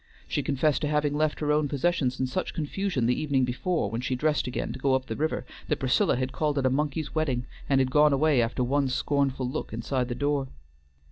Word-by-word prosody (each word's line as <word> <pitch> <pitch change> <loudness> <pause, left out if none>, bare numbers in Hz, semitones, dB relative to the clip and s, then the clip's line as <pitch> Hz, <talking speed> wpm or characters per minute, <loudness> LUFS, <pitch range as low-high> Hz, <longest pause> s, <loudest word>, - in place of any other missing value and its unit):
She - - -1
confessed 145 +2 +1
to 150 - 0
having 150 -1 +1
left 155 +1 0
her 150 -1 +1
own 150 0 +2
possessions 140 -2 0
in 130 - +1
such 155 +9 -3
confusion 160 -3 -1
the 125 +1 +1
evening 140 -4 +2
before 125 - -1
when 115 +1 -2
she 130 0 -1
dressed 150 0 +1
again 125 - -3
to - - -8
go 135 0 +2
up 130 0 -1
the 110 - -4
river, 155 +4 -1 0.2
that 150 - 0
Priscilla 130 -2 +2
had 130 +1 -2
called 150 +1 -1
it 135 - +1
a 130 - +3
monkey's 150 +2 -1
wedding, 135 -6 0 0.2
and 135 -1 +4
had 130 -1 +1
gone 150 +1 +5
away 140 -1 +3
after 120 +2 0
one 140 +2 +1
scornful 135 0 0
look 125 - -4
inside 125 +2 -1
the 120 - -3
door. 145 0 0
140 Hz, 225 wpm, -27 LUFS, 130-150 Hz, 0.2 s, gone